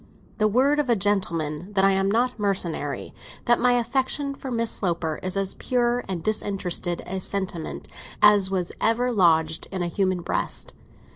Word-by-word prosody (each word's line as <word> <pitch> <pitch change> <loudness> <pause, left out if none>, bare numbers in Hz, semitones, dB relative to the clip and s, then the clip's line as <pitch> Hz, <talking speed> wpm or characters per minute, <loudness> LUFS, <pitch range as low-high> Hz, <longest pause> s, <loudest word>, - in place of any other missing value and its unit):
"The 215 - +4
word 265 +7 +3
of 285 -4 0
a 235 - +5
gentleman 180 -4 -1
that 195 -1 +3
I 195 - +5
am 195 0 +1
not 240 +3 +1
mercenary; 170 -9 -2 0.3
that 240 0 +4
my 250 0 +4
affection 265 +4 0
for 275 -1 -8
Miss 230 -2 0
Sloper 170 -4 -2
is 185 +1 -3
as 195 -1 0
pure 245 -1 0
and 180 -4 -4
disinterested 195 -5 -1
a 190 +1 -3
sentiment 185 -4 -4 0.3
as 205 -2 +6
was 185 -2 -2
ever 240 +3 +2
lodged 160 -6 +2
in 185 -2 -2
a - - -1
human 185 -3 0
breast! - - -2
195 Hz, 165 wpm, -24 LUFS, 180-240 Hz, 0.3 s, as